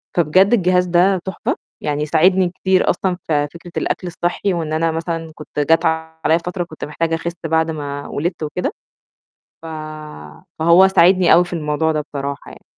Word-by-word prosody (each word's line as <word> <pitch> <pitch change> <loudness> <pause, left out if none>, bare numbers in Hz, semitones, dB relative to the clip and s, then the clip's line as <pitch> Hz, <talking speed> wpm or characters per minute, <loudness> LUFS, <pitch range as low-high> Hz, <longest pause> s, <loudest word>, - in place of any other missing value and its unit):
فبجد 180 +5 +4
الجهاز 180 -4 +3
ده 180 +2 +3
تحفة 190 -2 -2 0.3
يعني 150 0 -1
ساعدني 180 +4 +3
كتير 185 +1 +1
أصلًا 180 0 0
في 145 -2 +1
فكرة 170 +1 -11
الأكل 180 - -2
الصحّي 175 +3 -1
وإن 160 -3 -3
أنا 165 +1 +1
مثلًا 165 0 -4
كنت 150 - -7
جات 160 +3 +3
عليَّ 160 0 0
فترة 180 0 -2
كنت 160 -2 -8
محتاجة 165 +2 -1
أخِس 170 +1 -4
بعد 160 0 +1
ما 145 -2 -5
ولدت 165 +2 -3
وكده، 155 +4 -2 0.9
ف - - -9 0.9
فهو 170 +4 +6
ساعدني 185 -1 +5
أوي 175 +1 +6
في 175 - -11
الموضوع 160 -1 0
ده 155 - -1
بصراحة 140 -1 -6
يعني. - - -14
165 Hz, 165 wpm, -19 LUFS, 155-180 Hz, 0.9 s, فهو